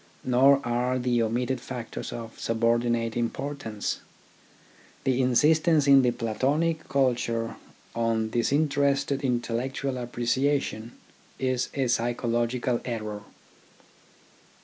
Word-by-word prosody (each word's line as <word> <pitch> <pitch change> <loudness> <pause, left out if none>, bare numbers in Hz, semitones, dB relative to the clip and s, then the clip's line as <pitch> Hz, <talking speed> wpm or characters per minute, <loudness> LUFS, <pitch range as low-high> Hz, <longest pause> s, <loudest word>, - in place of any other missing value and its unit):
Nor 135 +2 +5
are 125 +2 0
the 125 -1 +1
omitted 120 +3 -1
factors 120 -2 -6
of 115 -1 -8
subordinate 115 0 +1
importance. 120 -2 -3 1.0
The 130 0 +1
insistence 150 +4 +3
in 140 -1 +7
the 125 - +3
Platonic 145 +9 -1
culture 120 -4 0 0.4
on 115 -1 0
disin 140 +6 +2
terested 140 -1 +1
intellectual 125 +1 -2
appreciation 120 -1 -1 0.4
is 130 -1 -1
a 135 -2 +1
psycho 120 0 0
logical 120 +1 0
error. 110 -4 -4
125 Hz, 100 wpm, -26 LUFS, 115-135 Hz, 1.0 s, in